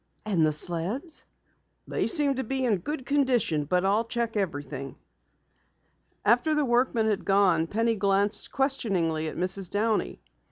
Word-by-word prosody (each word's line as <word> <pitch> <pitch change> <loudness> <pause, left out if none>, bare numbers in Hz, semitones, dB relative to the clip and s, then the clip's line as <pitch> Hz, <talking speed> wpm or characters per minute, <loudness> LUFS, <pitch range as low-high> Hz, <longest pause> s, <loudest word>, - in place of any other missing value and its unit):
"And 190 -7 +1
the 155 - +3
sleds?" 180 - -2 0.6
"They - - -1
seem 295 -6 +2
to 265 - -1
be 265 +2 -1
in 220 -5 +2
good 265 - -5
condition, 250 - +1
but 180 +4 +1
I'll 205 +4 +2
check 235 -1 -2
everything." 145 -8 -4 1.3
After 245 +8 +3
the 300 -1 +2
workman 240 -2 +2
had 215 -2 0
gone, 190 -5 +3
Penny 225 +4 0
glanced 200 +1 +1
questioningly 190 - 0
at - - -6
Mrs. 185 +1 0
Downey. 215 +1 -1
210 Hz, 145 wpm, -27 LUFS, 175-250 Hz, 1.3 s, the